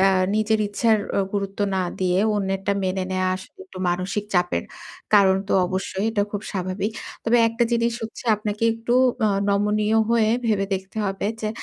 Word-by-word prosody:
এ্যা 195 0 +5 0.2
নিজের 215 0 +2
ইচ্ছার 220 +1 +2 0.2
ও - - +3
গুরুত্ব 200 -1 -3 0.2
না 190 - +1 0.2
দিয়ে 180 0 +2 0.2
অন্যেরটা 195 0 -1
মেনে 185 0 -1
নেওয়া 185 0 0
আসলে 190 - -14
একটু 280 - -11
মানসিক 185 +4 -1
চাপের 175 - +1 0.5
কারণ 190 -2 +6
তো - - 0
অবশ্যই। 190 +2 -3
এটা 205 -2 +1
খুব 205 - -3
স্বাভাবিক। 190 +2 -2 0.3
তবে 235 +2 +3
একটা 230 +1 -1
জিনিস 235 0 +2
হচ্ছে 220 +2 -7
আপনাকে 210 +1 -4
একটু 230 +2 -2 0.3
আ - - +3 0.2
নমনীয় 210 +2 +2
হয়ে 225 -2 +3 0.2
ভেবে 205 -3 +2
দেখতে 190 +3 -7
হবে। 195 0 -2
যে, 215 - -1
200 Hz, 170 wpm, -23 LUFS, 190-220 Hz, 0.5 s, কারণ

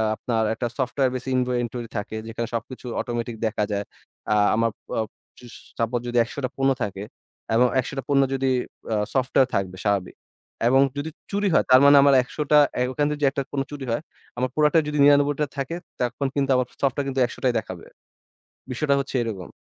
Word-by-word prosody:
আপনার 115 0 -1
একটা 120 +2 -2
সফটওয়্যার 130 0 0
বেসি 130 +1 -5
ইনভো 125 0 +1
ইনভেন্টরি 120 -1 -3
থাকে 105 +2 -4
যেখানে 115 +1 -4
সবকিছু 125 +3 -6 0.2
অটোমেটিক 120 -1 -4
দেখা 110 -1 -1
যায়। 100 0 -2 0.5
আ - - +3 0.2
আমার 115 +1 +1 0.2
প - - -37 0.5
চুশ 120 -2 -13 0.3
সাপোজ 115 +1 0
যদি 120 0 -1
১০০ 120 - -8
টা - - -2
পণ্য 135 0 +3
থাকে 100 -1 -4 0.5
এবং 125 +2 +5
১০০ 130 - -3
টা 135 - -2
পণ্য 140 -1 +4
যদি 135 0 0 0.4
আ - - +2 0.2
সফটওয়্যার 130 0 +2
থাকবে 95 -2 -2
স্বাভাবিক। 100 -3 0 0.5
এবং 135 +2 +5 0.2
যদি 145 +3 -3 0.2
চুরি 205 0 0
হয় - - +4
তার 130 +1 +8
মানে 140 0 +8
আমার 140 0 +5
১০০ 150 +4 -4
টা 150 - +8 0.2
এ্যা 125 0 +1
ওখান 145 +3 0
থেকে 150 0 -4
যে - - +6
একটা 140 - -2
কোনো 135 -1 0
চুরি 145 -2 -6
হয়। 115 - -1 0.4
আমার 130 +1 0
প্রোডাক্টটা 150 +2 +4
যদি 150 0 -2
৯৯ 145 0 +5
টা - - +3
থাকে, 140 +4 -3 0.3
তখন 125 +3 -1
কিন্তু 140 -1 0
আমার 125 -1 +1 0.2
সফটওয়্যার 140 0 +1
কিন্তু 135 -1 -2
১০০ 120 - -8
টাই 125 -2 +3
দেখাবে। 95 -5 -9 0.9
বিষয়টা 140 +3 +1
হচ্ছে 135 0 -4
এরকম। 100 -6 -5
125 Hz, 200 wpm, -24 LUFS, 115-140 Hz, 0.9 s, তার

